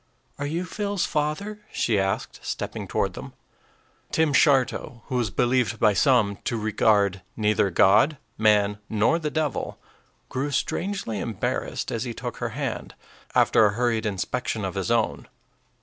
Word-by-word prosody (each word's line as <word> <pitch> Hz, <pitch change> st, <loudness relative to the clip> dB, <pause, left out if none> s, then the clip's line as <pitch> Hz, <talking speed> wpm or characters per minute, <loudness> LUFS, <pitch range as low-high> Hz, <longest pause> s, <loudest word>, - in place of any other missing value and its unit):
"Are 145 Hz, -, -2 dB
you 170 Hz, +5 st, -2 dB
Phil's 200 Hz, 0 st, -2 dB
father?" 155 Hz, +8 st, -2 dB
she 110 Hz, -4 st, +1 dB
asked, 95 Hz, 0 st, -2 dB
stepping -, -, -4 dB
toward -, -, 0 dB
them. -, -, -9 dB, 0.8 s
Tim 160 Hz, -2 st, +2 dB
Shartow, 130 Hz, -4 st, +2 dB
who 130 Hz, -, -4 dB
was 120 Hz, -4 st, 0 dB
believed 120 Hz, +1 st, +1 dB
by 105 Hz, -2 st, +4 dB
some 105 Hz, -3 st, +3 dB
to 115 Hz, -, -3 dB
regard 105 Hz, -3 st, +2 dB, 0.2 s
neither 105 Hz, -2 st, +2 dB
God, 105 Hz, -, +4 dB, 0.2 s
man, 105 Hz, -1 st, +3 dB
nor 110 Hz, +10 st, +2 dB
the 155 Hz, -2 st, -2 dB
devil, 155 Hz, -1 st, -2 dB, 0.5 s
grew 135 Hz, +3 st, -2 dB
strangely 165 Hz, -, -2 dB
embarrassed 110 Hz, -2 st, -3 dB
as -, -, -2 dB
he -, -, -5 dB
took -, -, -5 dB
her -, -, -2 dB
hand, -, -, -4 dB, 0.4 s
after -, -, +5 dB
a 100 Hz, -, -1 dB
hurried 115 Hz, -1 st, 0 dB
inspection 105 Hz, +2 st, -2 dB
of 95 Hz, -, -3 dB
his 95 Hz, +2 st, -2 dB
own. 115 Hz, -2 st, 0 dB
115 Hz, 150 wpm, -25 LUFS, 105-145 Hz, 0.8 s, after